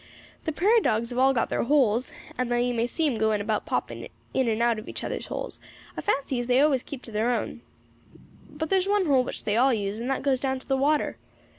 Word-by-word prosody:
The 320 - 0
prairie 420 +9 +3
dogs 230 - 0
have 245 - -2
all 265 +1 +5
got 250 - 0
their - - +1
holes, 250 -3 +2 0.2
and 255 -1 -2
though 240 - +1
you 245 +1 +1
may 235 0 0
see 320 +6 -1
'em 255 -7 0
going 220 -1 +2
about 215 +1 -2
popping - - -3 0.3
in 260 -2 +1
and 220 -1 0
out 235 -1 +2
of 215 - -9
each - - -6
other's - - -4
houses, - - -5 0.4
I - - -4
fancy 275 -9 0
as 240 - -3
they 250 +1 +4
always 280 -3 +3
keep 265 -1 -9
to 230 - -10
their 220 +3 0
own. 245 - -2 0.9
But 310 +1 -5
there's 380 0 +2
one 405 -1 +2
hole 270 -5 +4
which - - -6
they 210 +1 0
all 265 +3 +5
use, 205 0 -3
and 240 +3 -3
that 270 - -1
goes 270 -2 +2
down 265 0 -1
to 255 - -13
the 270 - +2
water. 290 +3 +1
255 Hz, 250 wpm, -26 LUFS, 230-285 Hz, 0.9 s, all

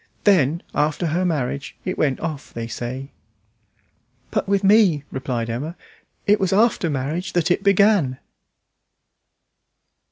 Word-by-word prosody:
Then, 170 -5 +3
after 150 +3 0
her 170 +3 0
marriage, 145 -3 -2
it 185 - -2
went 140 -4 0
off, 155 -4 -5
they 115 -1 -3
say." 125 +4 -6 1.2
"But - - -1
with 200 0 +2
me," 195 -7 +4
replied 125 -3 -3
Emma, 140 +9 -4 0.5
"it 205 +1 +4
was 190 -2 0
after 210 -3 +3
marriage 150 +6 -3
that 175 -1 +1
it 180 - +2
began." 200 -9 +3
160 Hz, 125 wpm, -22 LUFS, 135-190 Hz, 1.2 s, me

